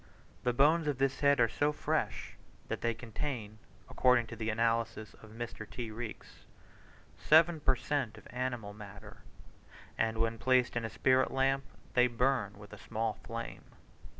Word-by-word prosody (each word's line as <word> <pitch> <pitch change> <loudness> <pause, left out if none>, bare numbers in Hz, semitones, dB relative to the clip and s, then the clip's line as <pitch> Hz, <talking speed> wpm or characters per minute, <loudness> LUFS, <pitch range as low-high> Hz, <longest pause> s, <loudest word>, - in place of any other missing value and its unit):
The 125 - +1
bones 150 +6 +4
of 145 -3 0
this 135 0 +1
head 140 -1 +4
are 115 - +6
so 145 +6 +1
fresh, 150 - -2 0.4
that - - -3
they 115 -1 0
contain, 115 -2 -5 0.3
according 125 -2 +3
to - - -5
the 110 0 -3
analysis 115 -1 0
by 110 - -12
Mr. 110 -1 -7
T. 120 -3 -5
Reeks, 115 0 -8 0.8
seven 160 - +5
per 135 -3 +3
cent 130 -2 -2
of - - -14
animal 125 -5 -3
matter; 105 0 -11 0.8
and 110 0 +1
when 115 0 0
placed 125 -1 +3
in 120 - -1
a - - -3
spirit 130 +2 +3
lamp, 135 +1 +1 0.3
they 125 0 +5
burn 120 -4 0
with 105 0 -12
a 105 - -10
small 110 +2 -2
flame. 115 0 -6
120 Hz, 160 wpm, -32 LUFS, 110-135 Hz, 0.8 s, are